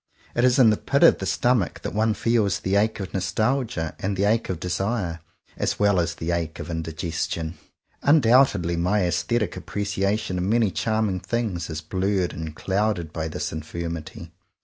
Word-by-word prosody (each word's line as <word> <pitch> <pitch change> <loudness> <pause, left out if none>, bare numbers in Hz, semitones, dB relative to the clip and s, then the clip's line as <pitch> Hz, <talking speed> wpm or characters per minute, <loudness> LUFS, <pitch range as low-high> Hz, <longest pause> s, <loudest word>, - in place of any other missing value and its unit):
It 120 - +1
is 125 +1 +4
in 120 -5 +7
the 105 - +1
pit - - +1
of - - +7
the - - -3
stomach 120 -6 +1
that - - -4
one 110 +1 +1
feels 115 -4 +1
the 95 +1 0
ache 110 +2 +2
of 95 -2 -6
nostalgia 110 -3 -1
and 95 0 -2
the 100 - +1
ache 110 +3 +2
of 90 -4 -2
desire, 90 -1 -2 0.4
as - - -1
well 100 -2 +3
as 85 0 -1
the 80 +2 -3
ache 85 -2 -2
of 75 - -6
indigestion. 80 0 -3 0.4
Un 150 +3 +5
doubtedly 115 - +3
my 95 +4 +2
aesthetic 105 +6 0
appreciation 100 0 -2
of - - -1
many 110 +1 +2
charming 110 -4 0
things 100 -7 -2
is 80 0 -4
blurred 95 +2 -1
and 80 -1 -6
cloud 105 +4 0
ed 80 -3 -7
by 80 -1 -2
this 75 -2 -4
infirmity. 85 +1 -6
95 Hz, 180 wpm, -24 LUFS, 85-110 Hz, 0.4 s, in